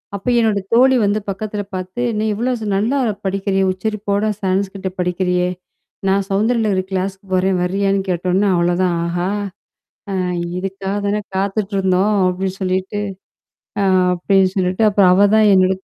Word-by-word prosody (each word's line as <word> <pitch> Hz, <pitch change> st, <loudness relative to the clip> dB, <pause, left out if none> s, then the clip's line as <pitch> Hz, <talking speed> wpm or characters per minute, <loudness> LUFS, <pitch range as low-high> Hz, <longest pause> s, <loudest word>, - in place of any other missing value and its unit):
அப்ப 200 Hz, +4 st, -8 dB
என்னோட 220 Hz, -3 st, +2 dB
தோழி 260 Hz, +3 st, +5 dB
வந்து 205 Hz, +1 st, +1 dB
பக்கத்தில 205 Hz, +1 st, -4 dB
பாத்து, 185 Hz, +5 st, -5 dB, 0.2 s
நீ 215 Hz, -, 0 dB
இவ்ளோ 235 Hz, +5 st, -1 dB
ஸ் 220 Hz, -, -5 dB
நல்லா 225 Hz, +8 st, +1 dB, 0.3 s
படிக்கிறியே 195 Hz, 0 st, 0 dB
உச்சரிப்போட 205 Hz, +1 st, -2 dB, 0.2 s
சான்ஸ்கிரீட்ட 190 Hz, 0 st, -1 dB
படிக்கிறியே? 180 Hz, 0 st, 0 dB, 0.6 s
நான் 195 Hz, 0 st, +2 dB
சௌந்தரலகரி 210 Hz, -1 st, +1 dB
கிளாஸ்க்கு 190 Hz, +1 st, -3 dB
போறேன்! 185 Hz, 0 st, +2 dB
வர்றியான்னு? 195 Hz, +2 st, 0 dB
கேட்டோன்னே 185 Hz, +3 st, +1 dB
அவ்ளோதான், 175 Hz, +1 st, +1 dB
"ஆஹா! 175 Hz, +2 st, -1 dB, 0.8 s
அ -, -, -2 dB, 0.4 s
இதுக்காக 195 Hz, +1 st, -4 dB
தானே 205 Hz, +1 st, 0 dB
காத்துட்டு 200 Hz, +1 st, -1 dB
இருந்தோம்!" 190 Hz, +2 st, +2 dB
அப்டின்னு 185 Hz, +1 st, -2 dB
சொல்லிட்டு 190 Hz, +2 st, -1 dB, 0.8 s
ஆ -, -, +2 dB, 0.3 s
அப்டின்னு 190 Hz, +1 st, +2 dB
சொல்லிட்டு, 185 Hz, +3 st, +1 dB
அப்பறம் 195 Hz, -3 st, +4 dB
அவ 200 Hz, +2 st, +5 dB
தான் 215 Hz, -1 st, +5 dB
என்னடக் 190 Hz, 0 st, +2 dB
195 Hz, 135 wpm, -18 LUFS, 185-205 Hz, 0.8 s, தோழி